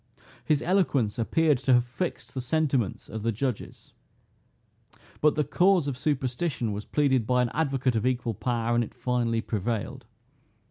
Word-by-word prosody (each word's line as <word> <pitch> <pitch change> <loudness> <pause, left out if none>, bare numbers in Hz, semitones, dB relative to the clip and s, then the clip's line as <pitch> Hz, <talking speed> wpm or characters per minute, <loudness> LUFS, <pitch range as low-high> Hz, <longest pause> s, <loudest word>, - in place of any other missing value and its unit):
His 150 -2 +1
eloquence 140 - +1
appeared 150 +4 +2
to 130 0 +2
have 120 0 +4
fixed 145 +9 -5
the 130 - -3
sentiments 130 -5 0
of 110 - -6
the 115 +2 0
judges; 120 +1 -4 1.3
but 150 0 +3
the 150 - +2
cause 180 +2 +3
of 140 - -2
superstition 130 -2 -1
was 105 +1 -5
pleaded 130 -6 +1
by 125 0 +3
an 120 - -1
advocate 135 -5 0
of 110 +3 +1
equal 125 -2 -1
power, 120 +2 -1
and 120 0 +3
it 110 - -9
finally 120 -2 0
prevailed. 115 +4 -3
125 Hz, 155 wpm, -27 LUFS, 115-145 Hz, 1.3 s, have